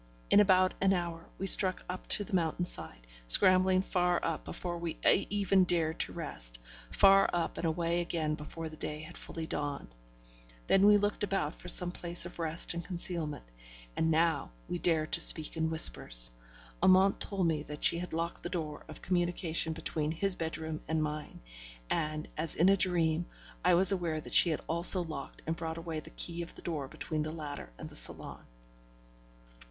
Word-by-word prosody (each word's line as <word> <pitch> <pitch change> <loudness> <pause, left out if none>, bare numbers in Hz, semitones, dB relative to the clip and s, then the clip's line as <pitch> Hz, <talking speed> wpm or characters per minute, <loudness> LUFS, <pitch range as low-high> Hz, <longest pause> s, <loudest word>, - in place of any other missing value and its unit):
In - - +6
about 185 -2 +3
an 195 0 +2
hour, 170 -2 -5
we 195 - -5
struck 190 -1 +5
up 180 +1 -8
to 205 - +4
the 205 - -13
mountainside, 165 - +4 0.2
scrambling 185 - +3
far 180 -2 -1
up 165 -2 -4
before 175 -1 -7
we 170 -1 -6
even 195 -1 +1
dared 165 -3 -2
to - - -1
rest; - - -3 0.3
far 195 - +4
up 175 -1 -4
and 170 - -2
away 170 +1 -2
again 160 -3 -3
before 155 +2 -8
day 155 -1 -8
had 155 - -12
fully 165 -1 -8
dawned. 145 - -6 0.7
Then 195 +1 +3
we 210 0 +5
looked 205 0 -3
about 195 -6 -3
for - - -14
some 175 0 +1
place 175 -1 +2
of 175 - -11
rest 165 +1 0
and 170 0 -6
concealment: 170 - -4 0.5
and 160 - -1
now 160 -2 0 0.2
we 175 - -5
dared 160 -3 -1
to 165 - +1
speak 155 -1 +3
in 160 0 -2
whispers. - - +5 0.5
Amante 190 +2 +3
told 195 -3 -3
me 160 -3 -1
that 150 0 -9
she 170 - +2
had 180 - -8
locked 165 +1 -5
the 175 - -6
door 155 -5 -6
of - - -12
communication 175 -2 -2
between 155 -1 -4
his 195 +4 +3
bedroom 160 -2 -6
and 160 0 -2
mine, 150 0 -7 0.5
and, 155 0 -3
as 160 +1 -4
in 175 +4 +2
a 195 - +4
dream, 175 -3 0 0.4
I 180 -1 +3
was 185 +2 +11
aware 170 -5 -3
that - - -7
she 175 - +6
had 155 - -3
also 170 +2 +6
locked 155 -4 -10
and 160 - -3
brought 165 -1 -7
away 165 -1 -6
the 155 - -13
key 170 +1 -5
of 170 - -10
the - - -13
door 150 -5 -5
between 155 +3 -6
the 155 +1 -5
latter 150 - -9
and - - -9
the - - -14
salon. - - +1
170 Hz, 185 wpm, -29 LUFS, 155-180 Hz, 0.7 s, was